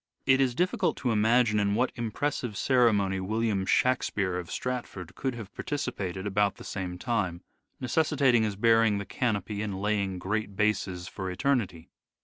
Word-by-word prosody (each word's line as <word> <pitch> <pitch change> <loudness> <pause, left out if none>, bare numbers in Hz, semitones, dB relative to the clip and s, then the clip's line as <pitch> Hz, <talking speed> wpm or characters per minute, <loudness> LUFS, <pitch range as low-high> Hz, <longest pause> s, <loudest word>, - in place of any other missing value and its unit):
It 135 0 +4
is 125 -3 +1
difficult 180 +5 +1
to 125 - -1
imagine 110 0 +3
in 100 0 +1
what 125 +3 +1
impressive 120 -1 -3
ceremony 105 -7 +3
William 105 0 -1
Shakspere 100 -7 +1
of 85 - -8
Stratford 120 -8 -4
could 130 -2 -3
have 110 -4 -9
participated 100 -10 -4
about 100 0 +1
the - - -12
same 90 -2 -5
time, 95 -6 -2 0.4
necessitating 135 -2 +2
his 105 -2 -1
bearing 115 0 +4
the 100 - -4
canopy 105 -2 -2
and 100 -3 -3
laying 100 -2 0
great 100 +2 -3
bases 95 -4 0
for 95 -1 -5
eternity. 95 - -1
105 Hz, 150 wpm, -28 LUFS, 95-120 Hz, 0.4 s, It